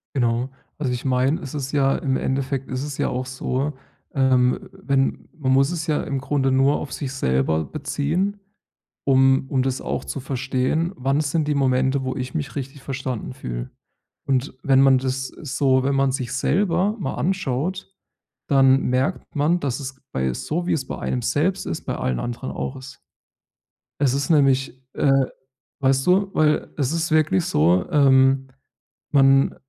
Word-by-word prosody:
Genau. 120 0 +1 0.3
Also, 130 -4 -1
ich 125 - -4
meine, 130 +5 +1
es 135 - -7
ist 140 -1 -4
ja 135 -1 +3
im 135 -2 -1
Endeffekt 135 0 -2
ist 130 +1 -3
es 145 -2 -5
ja - - 0
auch 125 +1 -3
so, 130 +2 -2 0.4
ähm, 130 -2 +2
wenn 135 -1 -1
man 135 -3 0
muss 135 +4 +4
es 165 -2 -3
ja 150 - +1
im 135 -1 -2
Grunde 135 -1 0
nur 135 +2 +3
auf 140 - -6
sich 135 -3 -4
selber 80 - 0
beziehen, 155 +7 -2 0.7
um 135 0 +4
und 130 -1 +1
das 130 -1 -1
auch - - -3
zu 140 - -5
verstehen: 135 +5 -1
„Wann 135 +4 +1
sind 150 +1 0
die 150 - +1
Momente, 130 0 +2
wo 130 - -3
ich 130 0 -4
mich 145 -2 -3
richtig 135 0 -6
verstanden 130 - -4
fühle?“ - - -6 0.6
Und 135 0 0
wenn 135 -1 +4
man 135 -1 +6
das, 130 0 -2
äh, 155 - -13
so 130 -1 +2
wenn 140 0 +1
man 135 -1 +2
sich 130 -2 -3
selber 190 +5 +1
mal 135 - -3
anschaut, 185 +1 -2 0.6
dann 135 -1 +5
merkt 130 +10 -1
man, 160 +5 +2
dass 135 0 -2
es 130 -1 -7
bei 65 -1 0
so, 175 - -3
wie - - +3
es 135 -4 -3
bei - - -5
einem 125 -1 -2
selbst 155 +10 0
ist, 80 - -4
bei - - -2
allen 65 -1 -1
anderen 120 +2 -4
auch 135 - -4
ist. 130 -1 -11 1.0
Es 135 -3 +2
ist 140 +4 -1
nämlich, 135 -4 +2
äh, 135 -1 +3 0.6
weißt 135 +3 +2
du 195 +2 +3
weil 150 -1 +1
es 140 +1 0
ist 165 -1 -1
wirklich 150 - +3
so, 85 +4 +2
ähm, 135 -2 +4 0.6
man 135 -1 +4
135 Hz, 175 wpm, -22 LUFS, 130-145 Hz, 1.0 s, man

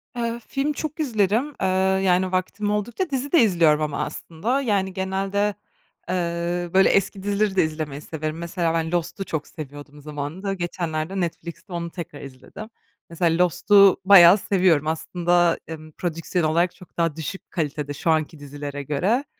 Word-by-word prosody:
Eee, 235 -1 -2
film 285 +2 -1
çok 310 +2 -5
izlerim. 225 -3 +1 0.2
Iıı, 190 0 +2
yani, 185 0 +2
vaktim 200 +3 -1
oldukça 240 - -2
dizi 275 +1 -3
de 335 - +6
izliyorum 165 -7 +4
ama 150 -2 -1
aslında. 230 +12 -3
Yani, 195 -6 0
genelde, 195 +2 -1 0.5
eee, 175 -1 -2
böyle, 190 - +6
eski 195 0 +1
dizileri 205 -1 0
de 180 - +4
izlemeyi 155 -2 -4
severim. 155 0 -5
Mesela 170 -1 -1
ben 165 -1 -1
Lost'u 175 +3 -2
çok 155 -4 -4
seviyordum 145 -1 -10
zamanında. 150 +7 -4
Geçenlerde 175 0 -3
Netflix'te 170 +2 -5
onu 170 0 -4
tekrar 165 -4 -8
izledim. 140 - -10 0.4
Mesela 170 +1 +2
Lost'u 195 +3 +5
bayağı 190 -1 +9
seviyorum 180 -7 +2
aslında, 170 +2 +1
emm, 155 -1 -9
prodüksiyon 170 +1 -2
olarak 170 +2 +1
çok 180 - -17
daha 165 -2 0
düşük 165 +4 -7
kalitede 150 -3 -3
şu 165 - -1
anki 155 0 0
dizilere 145 0 -6
göre, 190 - 0
175 Hz, 150 wpm, -23 LUFS, 160-195 Hz, 0.5 s, bayağı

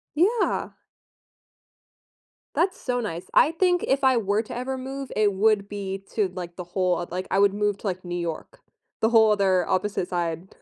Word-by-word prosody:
Yeah. 410 +9 +1 1.8
That's 370 +2 +1
so 250 -1 -1
nice, 180 -6 -4
I 300 - +6
think 355 +1 +1
if 270 +1 +1
I 260 -1 +5
were 205 -2 +1
to 230 - -8
ever 260 +2 -3
move 270 +1 -6
it 210 -1 +3
would 200 0 +2
be 195 -1 -5
to, 210 -4 +2
like, 175 -2 -6
the 180 - -6
whole 180 +1 0
oth 175 - -5
uh, - - -24
like, 185 +1 -3
I 195 - +2
would 200 -1 +5
move 205 0 0
to, - - -8
like, 185 0 -4
New 175 0 -4
York, 170 - -5 0.4
the 220 - +3
whole 220 -2 +6
other 190 -3 +2
opposite 190 -1 -1
side 170 0 -3
205 Hz, 190 wpm, -25 LUFS, 185-250 Hz, 1.8 s, I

